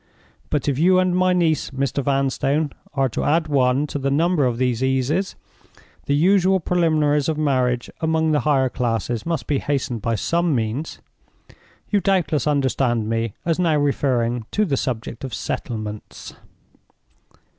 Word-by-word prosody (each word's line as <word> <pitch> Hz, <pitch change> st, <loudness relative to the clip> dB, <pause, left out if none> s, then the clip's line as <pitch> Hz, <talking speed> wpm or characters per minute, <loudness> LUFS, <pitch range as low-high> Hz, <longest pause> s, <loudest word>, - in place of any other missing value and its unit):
But 150 Hz, -2 st, -1 dB
if 140 Hz, -1 st, 0 dB
you 185 Hz, +3 st, +5 dB
and 185 Hz, -1 st, +2 dB
my 185 Hz, 0 st, +3 dB
niece, 170 Hz, -4 st, +1 dB
Mr. 135 Hz, 0 st, -2 dB
Vanstone, 140 Hz, +2 st, 0 dB, 0.2 s
are 135 Hz, -1 st, +2 dB
to -, -, -3 dB
add 160 Hz, +1 st, +2 dB
one 135 Hz, -1 st, +2 dB
to 145 Hz, -, -4 dB
the 135 Hz, 0 st, -1 dB
number 155 Hz, +1 st, +2 dB
of 120 Hz, -2 st, -2 dB
these 125 Hz, -1 st, 0 dB
eases, 130 Hz, +8 st, 0 dB, 0.7 s
the 140 Hz, -, +2 dB
usual 190 Hz, +4 st, +3 dB
preliminaries 155 Hz, -4 st, +1 dB
of 155 Hz, -, -1 dB
marriage 130 Hz, -5 st, 0 dB
among 160 Hz, 0 st, +1 dB
the 150 Hz, -, +3 dB
higher 135 Hz, -1 st, +2 dB
classes 120 Hz, 0 st, -2 dB
must 165 Hz, -2 st, -2 dB
be 145 Hz, -2 st, 0 dB
hastened 130 Hz, -5 st, -2 dB
by 115 Hz, +3 st, 0 dB
some 170 Hz, +5 st, 0 dB
means. 120 Hz, +7 st, -3 dB, 0.9 s
You 205 Hz, -, +3 dB
doubtless 175 Hz, -8 st, +1 dB
understand 130 Hz, -6 st, +1 dB
me 115 Hz, -2 st, -2 dB
as 165 Hz, 0 st, 0 dB
now 165 Hz, -4 st, +2 dB
referring 125 Hz, -5 st, 0 dB
to 215 Hz, -, +2 dB
the 145 Hz, -7 st, 0 dB
subject 120 Hz, -2 st, -4 dB
of 130 Hz, -5 st, -4 dB
settlements." 105 Hz, 0 st, -6 dB
140 Hz, 155 wpm, -21 LUFS, 125-160 Hz, 0.9 s, you